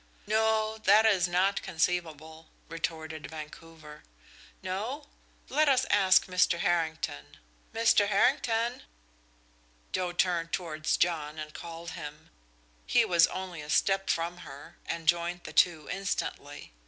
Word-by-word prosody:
"No 220 0 +1
that 215 +1 +5
is 190 -5 +3
not 185 +3 +1
conceivable," 160 -2 -3 0.2
retorted 160 -2 -5
Vancouver. 155 0 -11 0.6
"No? 225 +11 -4 0.4
Let 300 +2 +2
us 260 -1 +3
ask 190 -2 +5
Mr. 180 -1 +2
Harrington. 160 - -2 0.3
Mr. 225 -2 +3
Harrington!" 230 +2 +1 1.1
Joe 180 -1 -1
turned 175 -2 0
towards 160 -4 -1
John 155 -3 -1
and 155 0 -7
called 170 +1 -8
him. 150 -2 -9 0.6
He - - +4
was 170 -2 +5
only 185 -4 -6
a 150 - -10
step 195 +4 +1
from 170 +1 -1
her, 140 -4 -12
and 165 -1 -4
joined 175 +1 +1
the - - -9
two 165 -4 +3
instantly. 190 - -4
175 Hz, 120 wpm, -29 LUFS, 160-195 Hz, 1.1 s, that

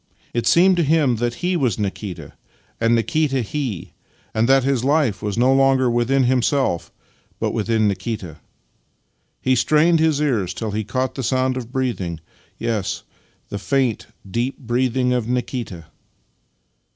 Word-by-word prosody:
It 120 -1 -1
seemed 180 +2 +5
to 170 - +3
him 145 -5 +2
that 120 +1 -1
he 180 0 +1
was 130 - +1
Nikita, 100 -2 -5 0.5
and 115 +1 +3
Nikita 145 +1 +1
he, 120 - -4 0.4
and 110 +3 +1
that 135 -1 +5
his 135 -3 +1
life 140 -5 +1
was 105 -1 -3
no 125 +3 +4
longer 135 -2 +3
within 120 +3 +2
himself, 125 - +1 0.5
but - - 0
within 110 -1 +1
Nikita. 95 -4 -4 1.0
He 130 - +2
strained 155 +6 +3
his 155 -2 +2
ears 110 -12 0
till 110 -2 -3
he 110 +1 -2
caught 130 +6 -2
the 135 - -4
sound 130 +1 +1
of 125 -2 -6
breathing 115 -11 -2 0.2
— - - -35
yes, 110 -5 -2 0.5
the 100 - -4
faint, 130 0 0 0.2
deep 120 +7 -2
breathing 125 0 0
of 120 -3 -1
Nikita. 120 -8 -3
125 Hz, 150 wpm, -21 LUFS, 110-135 Hz, 1.0 s, seemed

